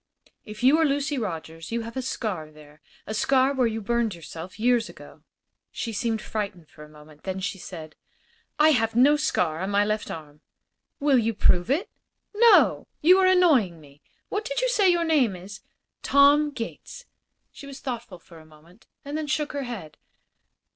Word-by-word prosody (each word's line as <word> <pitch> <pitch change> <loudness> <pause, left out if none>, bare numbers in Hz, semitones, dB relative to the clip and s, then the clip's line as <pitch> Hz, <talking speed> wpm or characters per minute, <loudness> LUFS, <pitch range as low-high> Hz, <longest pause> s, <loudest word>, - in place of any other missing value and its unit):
"If 215 +2 -9
you 280 +5 +5
are - - +4
Lucy 285 -1 0
Rogers 165 -5 -6
you 235 0 -1
have 230 +2 -8
a 260 - -2
scar 205 -11 -4
there 150 0 -18 0.2
a 215 - -5
scar 265 +4 +2
where 255 -3 +2
you 225 0 -3
burned 230 -1 -1
yourself 170 +4 -10
years 240 0 +2
ago." - - -14 0.5
She 230 - -5
seemed 220 +1 -2
frightened 200 -7 -5
for 150 - -13
a 150 - -14
moment. 150 0 -17
Then 190 0 -4
she 190 0 -4
said: 160 -4 -9 0.6
"I 305 +1 +5
have 225 -6 +1
no 275 +5 +5
scar 175 - 0
on 190 +2 -3
my 205 0 +2
left 215 0 -2
arm." 150 -2 -9 0.6
"Will 280 -3 +3
you 225 -1 -1
prove 180 -1 +2
it?" 305 +9 0 0.5
"No. 460 +2 +5
You 365 +5 +6
are 375 - +4
annoying 295 - +3
me. 145 -1 -19 0.3
What 415 - -2
did - - -3
you - - +1
say 415 -6 +3
your 345 -1 +2
name 275 - +2
is?" 195 +2 -10 0.4
"Tom 285 +2 +4
Gates." 230 -5 -8 0.5
She 280 - -12
was 275 -1 -9
thoughtful 235 -7 -6
for 170 -1 -16
a - - -15
moment 160 +6 -21 0.2
and 285 +1 -5
then 310 -1 -3
shook 300 0 -1
her 280 -2 -3
head. 200 -11 -8
225 Hz, 185 wpm, -25 LUFS, 175-280 Hz, 0.6 s, You